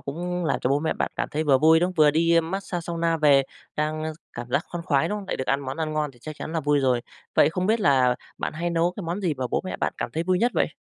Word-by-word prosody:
cũng 175 +5 -4
làm 160 - 0
cho 125 - 0
bố 140 - +3
mẹ 160 0 0
bạn - - -2
cảm - - -1
thấy 155 +2 -2
vừa 140 -3 +4
vui, 160 +3 +5
đúng 175 - +3
không, 185 - -7
vừa 150 -1 +6
đi 165 +2 +3
mát 170 +4 -3
xa 175 - -3
sauna 165 0 -1
về 145 -3 +5 0.3
đang 155 +1 -2 0.2
cảm 120 0 -6
giác 140 +6 +1
khoan 170 -1 -6
khoái, 140 -6 +2
đúng 210 - -2
không? 200 - -9
Lại - - -1
được 130 - -4
ăn 140 +1 +1
món 135 +1 -5
ăn 160 -1 -2
ngon 150 -1 -1
thì 120 - -21
chắc 155 -1 -7
chắn 160 - -6
là 165 - 0
vui 145 0 +2
rồi. 125 -2 +2 0.3
Vậy 145 - +5
không 180 +2 -2
biết 220 +1 +2
là 130 -8 +4 0.2
bạn - - -3
hay 170 +3 -2
nấu 170 +1 +1
cái 205 - -5
món 170 +4 -3
gì 175 -6 0
mà 130 -2 -3
bố - - +1
mẹ 185 - -4
bạn - - -1
cảm - - -3
thấy 160 - -1
vui 180 +1 +1
nhất 240 +3 +2
vậy? - - +2
160 Hz, 310 wpm, -25 LUFS, 145-175 Hz, 0.3 s, vừa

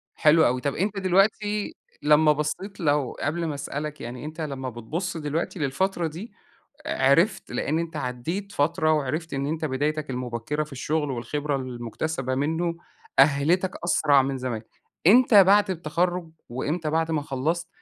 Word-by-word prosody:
حلو 155 +1 +5
أوي، 125 +1 +1
طَب 140 +1 -1
أنت 200 +3 -1
دلوقتي 205 +2 +1 0.3
لمّا 150 +1 +5
بَصّيت 170 +7 -3
لو 145 -5 +1
قبل 165 +3 -1
ما 150 - -2
أسألك 150 +1 -5
يعني 125 +4 -7
أنت 155 +2 -6
لمّا 135 -4 -4
بتبُص 160 - -4
دلوقتي 160 +4 -3
للفترة 170 +5 0
دي، 175 +10 -8 0.6
عرفت 140 +10 +2
لإن 155 +3 0
أنت 165 -1 -4
عدّيت 155 +12 -4
فترة 155 +2 +2
وعرفت 155 +3 -1
إن 135 +1 -1
أنت 160 +1 -2
بدايتك 150 +1 -1
المُبكّرة 125 +4 -3
في 150 - -16
الشغل 150 +2 -1
والخبرة 145 +3 -2
المُكتسبة 130 +2 -3
منه، 160 +5 0 0.4
أهّلِتك 150 +7 +4
أسرع 150 -5 +4
من 135 0 -2
زمان، 125 -3 -3 0.4
إمتى 215 -2 +7
بعد 200 +1 +4
التخرُج، 175 +1 -1 0.2
وإمتى 150 +6 -2
بعد 165 +1 0
ما 155 -2 0
خلّصت، 155 +5 -2
155 Hz, 150 wpm, -25 LUFS, 135-170 Hz, 0.6 s, إمتى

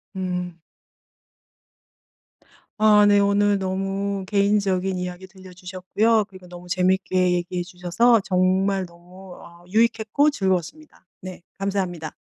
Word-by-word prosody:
음. 180 -2 -4 2.2
아 210 -1 +5
네. 205 0 +5
오늘 200 0 +2
너무 195 +1 -3
개인적인 200 -2 0
이야기 180 +1 -6
들려주셨고요. 190 +3 -2
그리고 185 -2 -15
너무 175 0 -12
재밌게 185 0 +1
얘기해 175 0 -2
주셔서 190 +6 +1
정말 190 +1 +1
너무 180 +2 -15
어 170 0 -16
유익했고 225 +6 +2
즐거웠습니다. 190 - -3 0.2
네. 185 -1 -9 0.2
감사합니다. 185 -5 -3
190 Hz, 270 characters per minute, -22 LUFS, 180-200 Hz, 2.2 s, 아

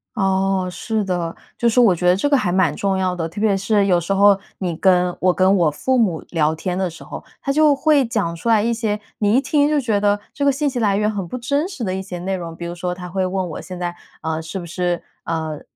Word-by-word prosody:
哦， 195 -2 +1
是 215 +4 -2
的， 175 -3 -2 0.2
就 235 - +3
是 250 - +2
我 220 -7 +6
觉 180 +1 -1
得 180 - +5
这 200 - 0
个 285 - +3
还 185 -8 0
蛮 175 -5 +2
重 195 -1 0
要 185 -1 0
的。 165 -2 -3
特 205 - -8
别 210 -2 +2
是 200 +1 +2
有 180 -3 +3
时 175 +4 -4
候 200 0 +5 0.2
你 175 -4 -3
跟 180 0 +2
我 180 -1 +3
跟 190 +1 +3
我 165 -3 +3
父 260 - 0
母 185 -9 +1
聊 160 -2 +1
天 180 +2 -3
的 190 -2 0
时 165 - -12
候， - - -8 0.2
他 275 - -1
就 300 -1 +4
会 290 -1 +3
讲 200 -7 -1
出 230 +8 -3
来 220 -2 +5
一 235 0 +1
些， 215 -3 -1 0.2
你 210 +2 +2
一 265 - +4
听 290 0 +2
就 300 -1 +2
觉 220 -6 0
得 205 0 +2
这 285 - -3
个 280 - +5
信 290 +2 -1
息 250 -2 -3
来 200 -3 +2
源 210 +1 +1
很 195 -4 -4
不 250 - -5
真 280 +7 -1
实 280 -11 -6
的 185 -2 -1
一 190 - -3
些 185 -2 -7
内 190 +2 -2
容。 165 -2 -6
比 170 - -7
如 170 - -4
说 180 0 -3
他 180 -1 -8
会 190 +1 -1
问 185 -1 -2
我， - - -6
现 180 -1 -8
在， 175 0 -3 0.3
呃， 160 0 -2
是 165 +4 -6
不 175 - -6
是， 175 +1 -2 0.2
呃， 160 -2 -3
190 Hz, 290 characters per minute, -20 LUFS, 175-225 Hz, 0.3 s, 我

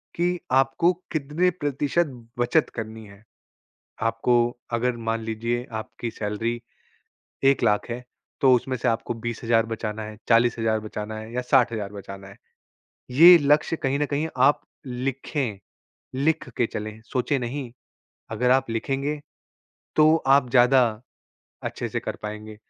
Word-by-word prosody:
कि 175 +1 0
आपको 135 +6 +3 0.2
कितने 155 +4 +1
प्रतिशत 145 +4 +1 0.3
बचत 125 +6 +2
करनी 110 -1 -6
है? 100 +1 -16 0.8
आपको 115 +2 +1 0.4
अगर 120 +1 0
मान 115 0 0
लीजिये 115 +2 -2 0.2
आपकी 115 +1 -7
सैलरी 115 +3 -3 0.8
1,00,000 120 -6 +3
है 120 +1 -5 0.4
तो 135 -2 +6
उसमें 130 +1 0
से 120 - -1
आपको 115 +1 -1
20,000 115 0 0
बचाना 110 -1 -4
है, 105 0 -8
40,000 115 -2 +3
बचाना 105 0 -6
है 110 +1 -9
या 125 - 0
60,000 115 -6 +2
बचाना 100 -1 -9
है। 100 - -14 0.8
ये 170 +6 +9
लक्ष्य 150 +2 +2
कहीं 135 +2 +1
न 150 - +2
कहीं 145 +2 -1 0.2
आप 145 - +2 0.3
लिखें। 130 -3 -3 0.6
लिख 150 0 0
के 120 - +3
चलें, 110 +1 -6
सोचें 125 +4 -1
नहीं 125 0 -4 0.6
अगर 125 0 +1
आप 130 -2 +3
लिखेंगे, 135 +5 -2 0.8
तो 155 +1 +6
आप 135 -2 +4
ज़्यादा 125 +1 +6 0.8
अच्छे - - -3
से - - -3
कर - - -5
पाएंगे। 105 0 -7
120 Hz, 135 wpm, -24 LUFS, 110-140 Hz, 0.8 s, ये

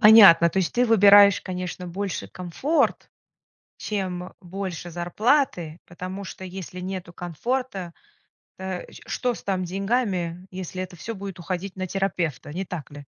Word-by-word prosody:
Понятно. 200 -6 +9
То 190 - -1
есть 185 - +1
ты 245 +1 +4
выбираешь, 205 -2 +8
конечно, 180 0 -5
больше 190 +2 -4
комфорт, 185 - 0 0.7
чем 185 -3 -3
больше 180 -2 -5
зарплаты, 175 - +1
потому 185 +3 -6
что, 190 - -8
если 185 -1 -7
нету 185 -1 -5
комфорта, 190 - -3 0.6
э, 190 -1 -4
ч - - -13
что 245 -2 -1
с - - -10
там 190 -2 -1
деньгами, 185 -2 -1
если 185 0 -5
это 185 -1 -8
всё 230 +7 -5
будет 195 -2 -7
уходить 185 +2 -4
на 185 0 -2
терапевта, 170 -7 -2
не 185 +4 -3
так 170 -5 -6
ли? 145 0 -10
185 Hz, 145 wpm, -25 LUFS, 175-200 Hz, 0.7 s, Понятно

